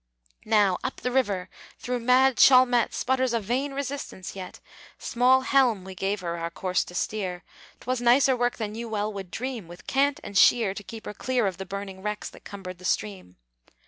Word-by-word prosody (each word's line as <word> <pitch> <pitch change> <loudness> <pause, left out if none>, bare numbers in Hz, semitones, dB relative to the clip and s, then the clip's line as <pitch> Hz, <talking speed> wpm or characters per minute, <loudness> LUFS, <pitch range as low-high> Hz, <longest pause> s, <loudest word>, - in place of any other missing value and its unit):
Now, 205 -4 +3
up 260 - -4
the 250 - -1
river! 205 -8 0 0.4
though 250 0 -1
mad 255 +1 +4
Chalmette 255 -2 +6
Sputters 260 -1 0
a 230 - +2
vain 250 +7 -2
resistance 275 -10 -5
yet, 185 -2 -8 0.4
Small 255 +2 +3
helm 255 -7 +2
we 190 0 -8
gave 195 +2 -2
her 170 -1 -4
our 165 0 -3
course 185 +2 -1
to 175 - -11
steer, 185 -2 -3 0.4
'Twas 255 0 -2
nicer 255 +2 +5
work 245 0 0
than 210 -2 -4
you 230 +1 -6
well 210 0 -2
would 195 -2 -7
dream, 240 -2 -5
With 175 +2 -13
cant 280 +1 +1
and 200 - -8
sheer 215 0 +5
to 205 - -8
keep 225 +2 -10
her - - -5
clear 250 +2 0
Of 190 -3 -2
the 190 - -6
burning 195 -1 -6
wrecks 210 +1 -4
that - - -16
cumbered 185 -3 -8
the - - -15
stream. 95 - -2
215 Hz, 195 wpm, -26 LUFS, 190-250 Hz, 0.4 s, Chalmette